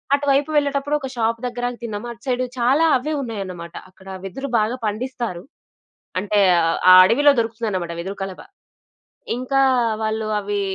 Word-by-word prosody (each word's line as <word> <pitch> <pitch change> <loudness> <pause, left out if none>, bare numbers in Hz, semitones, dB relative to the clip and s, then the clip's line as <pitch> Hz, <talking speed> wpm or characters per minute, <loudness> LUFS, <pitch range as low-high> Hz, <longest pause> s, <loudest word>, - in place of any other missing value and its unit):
అటు 285 0 -4
వైపు 280 +2 +2
వెళ్ళేటప్పుడు 285 0 +1
ఒక 265 - -5
షాప్ 230 0 0
దగ్గర 245 0 -4
ఆగి 245 - -9
తిన్నాము. 220 0 -5
అటు 235 0 -12
సైడు 255 0 0
చాలా 270 +7 +3
అవ్వే 305 +5 -4
ఉన్నాయన్నమాట 185 -8 -6 0.2
అక్కడ 190 +1 -19 0.2
వెదురు 270 +9 -6
బాగా 220 +4 0
పండిస్తారు. 220 -4 -4 0.8
అంటే 205 +2 0 0.2
అ - - +3
అ - - +2 0.2
ఆ - - +11
అడవిలో 290 +8 +5
దొరుకుతుందన్నమాట 220 -6 -2
వెదురు 190 +4 -5
కలబ. 195 -1 -5 1.0
ఇంకా 265 +2 0 0.4
వాళ్ళు 220 0 -2
అవి 205 0 -2
230 Hz, 155 wpm, -21 LUFS, 205-260 Hz, 1.0 s, ఆ